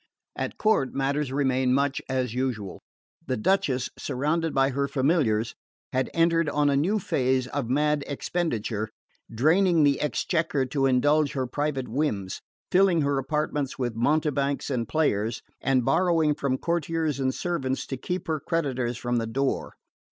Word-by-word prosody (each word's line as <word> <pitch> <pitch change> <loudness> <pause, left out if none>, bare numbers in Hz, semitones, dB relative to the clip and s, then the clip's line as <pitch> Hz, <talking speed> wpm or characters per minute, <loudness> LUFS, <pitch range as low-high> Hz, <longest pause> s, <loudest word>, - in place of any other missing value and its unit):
At - - -4
court 215 -12 +1
matters 140 0 0
remained 130 -2 +2
much 140 0 0
as 130 -3 -1
usual. 125 -6 -3 0.5
The 130 - -1
Duchess, 135 - +1
surrounded 150 +5 -1
by 135 0 +2
her 140 +1 0
familiars, 130 -6 +1 0.4
had 130 -1 0
entered 165 -1 +3
on 145 -1 +2
a - - +2
new 175 +10 +2
phase 130 -8 +1
of 125 -2 -3
mad 150 +2 +2
expenditure, 120 -8 -2 0.4
draining 165 - +3
the 140 -1 +3
exchequer 150 -2 0
to 135 +1 +1
indulge 145 +3 +3
her 130 -2 -1
private 135 0 -2
whims, 110 -8 -2 0.3
filling 185 -3 +4
her 140 -1 +1
apartments 145 0 -2
with 125 -3 -2
mountebanks 140 +2 0
and 120 -4 -1
players, 115 -8 0 0.2
and 130 -3 +2
borrowing 165 -2 +3
from 140 -2 -1
courtiers 165 -2 -1
and 130 -1 0
servants 135 -7 -2
to 135 - -4
keep 180 +8 -4
her 160 -2 -1
creditors 130 -7 -1
from 120 0 -1
the 115 -1 -1
door. 135 +4 -1
140 Hz, 150 wpm, -26 LUFS, 130-155 Hz, 0.5 s, filling